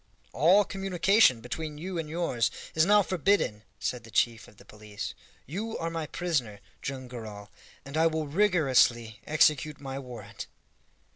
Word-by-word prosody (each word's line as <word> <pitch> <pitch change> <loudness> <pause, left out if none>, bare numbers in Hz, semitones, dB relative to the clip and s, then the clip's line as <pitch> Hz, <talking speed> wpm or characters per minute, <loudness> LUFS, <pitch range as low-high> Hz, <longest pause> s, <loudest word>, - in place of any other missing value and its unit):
"All 185 +8 +5
communication 195 - +3
between 150 +5 -5
you 175 +2 -4
and 155 -2 -4
yours 140 -9 0 0.2
is 160 +2 +3
now 205 0 +6
forbidden," 185 - +1 0.2
said 125 +1 -3
the 115 - -13
chief 115 +1 +1
of 105 - -19
the - - -17
police. 105 -1 -7 0.3
"You 215 - -4
are 165 0 -3
my 165 -2 -3
prisoner, 135 - -2 0.2
Joam 130 -2 -5
Garral, 110 -4 -9 0.3
and 140 +2 -8
I 160 +1 +4
will 160 -1 -1
rigorously 140 - +2
execute 150 -1 +3
my 135 -1 -5
warrant." 115 -5 -9
150 Hz, 150 wpm, -28 LUFS, 120-170 Hz, 0.3 s, now